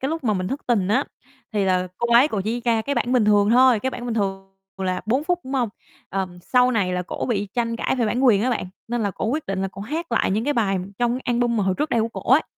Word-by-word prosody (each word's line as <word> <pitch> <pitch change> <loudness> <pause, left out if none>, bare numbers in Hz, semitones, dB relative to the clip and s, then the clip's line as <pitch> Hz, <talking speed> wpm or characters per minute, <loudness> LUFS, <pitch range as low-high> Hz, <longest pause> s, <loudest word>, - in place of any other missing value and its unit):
cái 265 - -1
lúc 320 -2 -3
mà 215 -3 +2
mình 185 0 -2
thất 275 - -3
tình 205 -6 +1
á, 255 +7 +2 0.5
thì 205 -2 +1
là 185 -1 +1
cô 235 0 0
ấy 255 +6 +6
cổ 210 - -2
chỉ 235 +3 -1
ra 225 -2 +2
cái 280 - -2
bản 250 - 0
bình 240 -4 +4
thường 205 0 +4
thôi. 250 -2 +5
Cái 260 - -1
bản 240 - -7
bình 230 - -2
thường 195 -2 -3 0.2
là 185 -1 -1
4 260 +7 +1
phút, 355 0 0
đúng 260 - -7
hông? 245 -4 +1 0.4
Ờ, 195 0 -1 0.2
sau 250 +4 +3
này 195 -6 0
là 180 - -1
cổ 175 - -4
bị 205 -3 -1
tranh 230 -1 -1
cãi 265 - -1
về 235 -3 +1
bản 250 +5 0
quyền 215 -5 +5
á 255 - +1
bạn. 240 - -1 0.2
Nên 240 -1 -1
là 205 - 0
cô - - -5
quyết 295 +7 -2
định 195 0 -2
là 195 - -1
cổ - - -9
hát 320 +9 -4
lại - - +2
những 215 +4 0
cái 290 - +1
bài 195 -5 +1 0.2
trong 240 0 +2
cái 255 - -4
album 240 -1 +1
mà 205 - +1
hồi 190 -1 +1
trước 305 +1 -1
đây 230 - +2
của 225 - 0
cổ 250 - +1
ấy. 300 - +6
230 Hz, 300 wpm, -23 LUFS, 200-255 Hz, 0.5 s, ấy